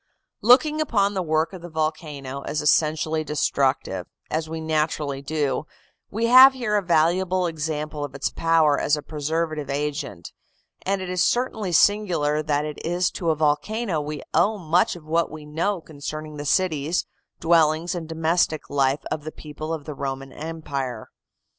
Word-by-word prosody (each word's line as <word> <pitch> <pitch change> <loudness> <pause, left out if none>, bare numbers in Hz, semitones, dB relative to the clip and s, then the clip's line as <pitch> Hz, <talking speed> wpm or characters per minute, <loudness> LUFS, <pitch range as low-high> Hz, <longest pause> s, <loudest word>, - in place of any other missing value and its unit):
Looking 300 +7 +5
upon 205 -9 +1
the 190 - -1
work 160 +1 0
of 185 - -8
the 175 - -8
volcano 150 -4 -3
as 150 - -1
essentially 155 +1 +2
destructive, 135 - 0 0.2
as 160 0 -1
we 160 0 -4
naturally 155 -3 -1
do, 150 0 -1 0.4
we 225 +4 -1
have 260 +3 +9
here 240 -5 -1
a 205 - +3
valuable 180 +2 +2
example 155 -2 -3
of 145 -1 -6
its 140 - -2
power 165 -3 +3
as 150 - +2
a 150 - -7
preservative 155 0 -2
agent; 140 - -4 0.5
and 195 -1 0
it 185 - -6
is 180 -1 0
certainly 220 -6 0
singular 170 -6 +3
that 150 -1 0
it 150 -1 -6
is 175 +2 0
to 170 - -2
a 160 - +3
volcano 160 +5 0
we 150 -1 -5
owe 200 +7 +3
much 175 0 +2
of 170 -3 -12
what 165 +2 +1
we 155 -1 -9
know 170 +5 -1
concerning 155 0 -7
the 145 - -5
cities, 160 -1 +1 0.3
dwellings 165 0 +3
and 165 -3 -5
domestic 160 0 0
life 140 0 +1
of 155 -1 -2
the 155 - -6
people 155 +1 -7
of 160 -3 -4
the 150 - -5
Roman 135 -1 -5
Empire. 140 -7 -5
155 Hz, 165 wpm, -24 LUFS, 150-175 Hz, 0.5 s, have